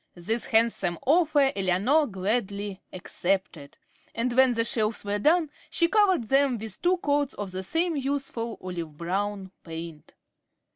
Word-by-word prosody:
This 215 Hz, +7 st, -1 dB
handsome 220 Hz, -6 st, +2 dB
offer 295 Hz, -2 st, +4 dB
Eleanor 200 Hz, -, +2 dB
gladly 200 Hz, -1 st, -2 dB
accepted, 180 Hz, -5 st, -3 dB, 0.4 s
and 240 Hz, +2 st, -1 dB
when 260 Hz, -1 st, +5 dB
the 230 Hz, -1 st, +1 dB
shelves 225 Hz, -3 st, -1 dB
were 205 Hz, 0 st, -1 dB
done, 310 Hz, +4 st, +3 dB, 0.2 s
she 335 Hz, -, +2 dB
covered 380 Hz, -, +3 dB
them 270 Hz, +1 st, +2 dB
with 220 Hz, 0 st, -5 dB
two 360 Hz, +1 st, +3 dB
coats 285 Hz, -4 st, 0 dB
of 205 Hz, -2 st, -5 dB
the 185 Hz, +1 st, -4 dB
same 325 Hz, -, 0 dB
useful 270 Hz, -5 st, -3 dB
olive 170 Hz, -5 st, -6 dB
brown 195 Hz, +3 st, -3 dB
paint. 165 Hz, -2 st, -9 dB
225 Hz, 140 wpm, -26 LUFS, 190-280 Hz, 0.4 s, when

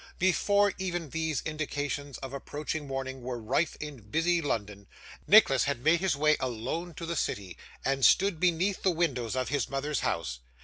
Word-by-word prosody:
Before 200 Hz, +2 st, +3 dB
even 175 Hz, -5 st, -3 dB
these 160 Hz, -4 st, -1 dB
indications 145 Hz, -2 st, -3 dB
of 135 Hz, 0 st, -6 dB
approaching 145 Hz, +2 st, -4 dB
morning 135 Hz, -1 st, -4 dB
were 125 Hz, 0 st, -4 dB
rife 125 Hz, +9 st, 0 dB
in 150 Hz, -5 st, -7 dB
busy 165 Hz, +11 st, +1 dB
London, 105 Hz, -8 st, -3 dB, 0.4 s
Nicholas 160 Hz, -, +6 dB
had 135 Hz, -3 st, -2 dB
made 165 Hz, +2 st, +4 dB
his 185 Hz, -3 st, +1 dB
way 150 Hz, +1 st, +3 dB
alone 130 Hz, +8 st, -3 dB
to 165 Hz, -, -6 dB
the 170 Hz, +1 st, -3 dB
city, 95 Hz, -, -2 dB, 0.3 s
and 135 Hz, 0 st, 0 dB
stood 195 Hz, +1 st, +5 dB
beneath 180 Hz, +3 st, +1 dB
the 190 Hz, -, +3 dB
windows 140 Hz, -10 st, 0 dB
of 130 Hz, 0 st, -1 dB
his 145 Hz, 0 st, -1 dB
mother's 140 Hz, +1 st, -1 dB
house. 70 Hz, -7 st, -2 dB
145 Hz, 170 wpm, -29 LUFS, 130-170 Hz, 0.4 s, Nicholas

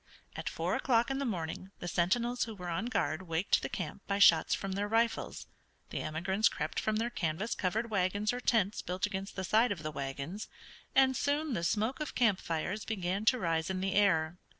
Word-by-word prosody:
At -, -, -3 dB
four -, -, -1 dB
o'clock 240 Hz, -1 st, +2 dB
in 270 Hz, -, -1 dB
the 280 Hz, -, -1 dB
morning 185 Hz, -3 st, -3 dB
the 175 Hz, -, -6 dB
sentinels 235 Hz, +9 st, +1 dB
who 225 Hz, -2 st, -7 dB
were 180 Hz, -2 st, -6 dB
on 190 Hz, +7 st, -1 dB
guard 160 Hz, -8 st, 0 dB
waked 165 Hz, +4 st, +2 dB
the -, -, -3 dB
camp 185 Hz, +1 st, -5 dB
by 200 Hz, -, 0 dB
shots 170 Hz, -5 st, +6 dB
from 195 Hz, -, -4 dB
their 200 Hz, +2 st, -1 dB
rifles, 230 Hz, +2 st, 0 dB, 0.5 s
the -, -, -2 dB
emigrants 190 Hz, +7 st, +1 dB
crept -, -, -3 dB
from 215 Hz, -, 0 dB
their 230 Hz, +2 st, 0 dB
canvas 170 Hz, +5 st, -1 dB
covered 220 Hz, +5 st, -1 dB
wagons 200 Hz, +2 st, +1 dB
or 245 Hz, -, -3 dB
tents 220 Hz, -4 st, +1 dB
built 180 Hz, +2 st, -1 dB
against 195 Hz, -1 st, -5 dB
the 190 Hz, -, -3 dB
side 220 Hz, +6 st, +3 dB
of 170 Hz, -6 st, -3 dB
the 155 Hz, -, -3 dB
wagons, 140 Hz, +8 st, -5 dB, 0.5 s
and 265 Hz, -1 st, +5 dB
soon 290 Hz, +2 st, 0 dB
the 170 Hz, -, -2 dB
smoke 220 Hz, -, 0 dB
of 305 Hz, -, -4 dB
camp 220 Hz, -6 st, +3 dB
fires 180 Hz, +6 st, -2 dB
began 195 Hz, -1 st, -2 dB
to 255 Hz, -, +5 dB
rise 165 Hz, -5 st, 0 dB
in 190 Hz, -1 st, -1 dB
the 190 Hz, +1 st, -1 dB
air. 175 Hz, -4 st, +2 dB
200 Hz, 205 wpm, -32 LUFS, 175-225 Hz, 0.5 s, shots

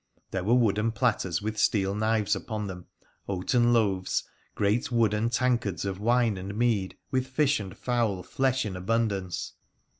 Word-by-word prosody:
There 95 Hz, -2 st, -2 dB
were 115 Hz, +6 st, +3 dB
wooden 110 Hz, -2 st, +2 dB
platters 110 Hz, -7 st, 0 dB
with 110 Hz, 0 st, -3 dB
steel 95 Hz, -3 st, +2 dB
knives 105 Hz, 0 st, +1 dB
upon 105 Hz, +2 st, -4 dB
them, 90 Hz, -2 st, -7 dB, 0.4 s
oaten 120 Hz, +6 st, +2 dB
loaves, 100 Hz, -6 st, +1 dB, 0.3 s
great 105 Hz, +5 st, +1 dB
wooden 115 Hz, -1 st, +2 dB
tankards 120 Hz, -8 st, 0 dB
of 95 Hz, -1 st, -3 dB
wine 115 Hz, -1 st, +2 dB
and 95 Hz, +2 st, -6 dB
mead, 110 Hz, -6 st, +1 dB
with 130 Hz, -1 st, 0 dB
fish 140 Hz, +1 st, +2 dB
and 95 Hz, -3 st, -8 dB
fowl 115 Hz, -7 st, 0 dB
flesh 130 Hz, +3 st, 0 dB
in 100 Hz, -3 st, -4 dB
abundance. 95 Hz, -2 st, -1 dB
110 Hz, 150 wpm, -27 LUFS, 95-120 Hz, 0.4 s, were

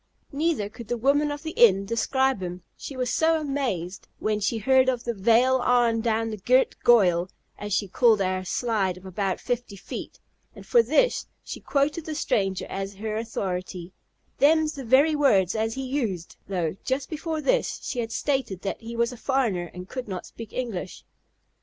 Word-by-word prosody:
Neither 290 Hz, -7 st, 0 dB
could 215 Hz, +2 st, -11 dB
the 240 Hz, -, -1 dB
woman 285 Hz, +5 st, +2 dB
of 290 Hz, +1 st, -5 dB
the 320 Hz, -, -4 dB
inn 200 Hz, -, +5 dB
describe 255 Hz, +2 st, +1 dB
him; 180 Hz, 0 st, -6 dB
she 275 Hz, -, -8 dB
was 250 Hz, -1 st, -1 dB
so 320 Hz, -1 st, +2 dB
"mazed," 240 Hz, -, -3 dB
when 215 Hz, -1 st, -1 dB
she 210 Hz, +3 st, 0 dB
heard 260 Hz, +4 st, +4 dB
of 245 Hz, -2 st, -1 dB
the 235 Hz, -, -2 dB
"vail 235 Hz, +5 st, +4 dB
arl 240 Hz, -2 st, +2 dB
down 225 Hz, 0 st, 0 dB
the 215 Hz, -, -5 dB
girt 255 Hz, +7 st, +3 dB
goyal," 185 Hz, -7 st, +4 dB, 0.3 s
as 205 Hz, 0 st, -6 dB
she 205 Hz, +1 st, +1 dB
called 225 Hz, +2 st, +4 dB
our 185 Hz, -1 st, 0 dB
slide 195 Hz, -2 st, -1 dB
of 185 Hz, -, -14 dB
about 190 Hz, 0 st, -2 dB
fifty 245 Hz, -4 st, -3 dB
feet; 195 Hz, -, -8 dB, 0.4 s
and -, -, -12 dB
for 480 Hz, -, +5 dB
this -, -, +1 dB, 0.2 s
she -, -, -7 dB
quoted 295 Hz, +3 st, 0 dB
the 310 Hz, -, -3 dB
stranger 195 Hz, -9 st, 0 dB
as 195 Hz, +1 st, -5 dB
her 215 Hz, +2 st, -4 dB
authority, 185 Hz, -5 st, -4 dB, 0.5 s
"them's 310 Hz, +2 st, +4 dB
the 275 Hz, -, -7 dB
very 280 Hz, +6 st, +4 dB
words 200 Hz, -, +3 dB
as 225 Hz, 0 st, -1 dB
he 270 Hz, -, -4 dB
used;" 230 Hz, -, -3 dB
though, 180 Hz, -4 st, -2 dB
just 265 Hz, +1 st, -1 dB
before 315 Hz, 0 st, -3 dB
this, -, -, 0 dB
she 250 Hz, -, -3 dB
had 225 Hz, -1 st, -3 dB
stated 265 Hz, -11 st, -2 dB
that 195 Hz, -, -3 dB
he 230 Hz, +1 st, -7 dB
was 235 Hz, +1 st, +1 dB
a 245 Hz, -, -9 dB
foreigner 225 Hz, -11 st, 0 dB
and 180 Hz, +1 st, -9 dB
could 255 Hz, +2 st, -6 dB
not 185 Hz, -3 st, -5 dB
speak 230 Hz, -2 st, -10 dB
English. 225 Hz, -8 st, -5 dB
230 Hz, 185 wpm, -25 LUFS, 195-270 Hz, 0.5 s, inn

